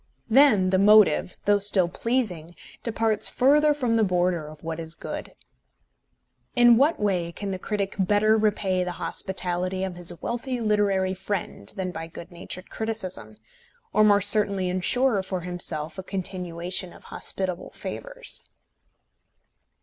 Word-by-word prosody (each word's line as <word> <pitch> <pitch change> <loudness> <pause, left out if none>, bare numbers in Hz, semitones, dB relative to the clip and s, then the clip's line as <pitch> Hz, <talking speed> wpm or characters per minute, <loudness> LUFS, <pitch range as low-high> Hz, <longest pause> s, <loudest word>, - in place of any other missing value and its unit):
Then 220 -8 +5
the 190 - +3
motive, 205 -4 +4
though 205 0 +4
still 195 -3 +4
pleasing, 180 -6 -2 0.3
departs 225 -2 +2
further 295 +4 +4
from 250 -6 0
the 225 - +3
border 180 -4 0
of 155 0 -13
what 165 0 -5
is 160 0 -1
good. - - -7 1.2
In 240 -1 +7
what 285 +7 +2
way 185 -5 0
can 200 +3 -5
the 185 - -4
critic 200 0 -3
better 205 +3 +3
repay 200 -4 +1
the 180 0 -4
hospitality 185 0 -3
of 185 -2 -4
his 175 -1 -1
wealthy 245 +1 -3
literary 205 -4 +1
friend 190 - -4
than 185 -1 -3
by 165 -1 -6
good 165 +1 -11
natured 180 +2 -7
criticism, 185 - -4 0.6
or 215 - +4
more 205 -1 +5
certainly 200 -2 +4
ensure 205 +5 +1
for 185 -1 -4
himself 170 -2 -2
a - - -3
continuation 180 -1 -3
of - - -16
hospitable 185 -2 -3
favours? - - -5
190 Hz, 140 wpm, -25 LUFS, 180-215 Hz, 1.2 s, In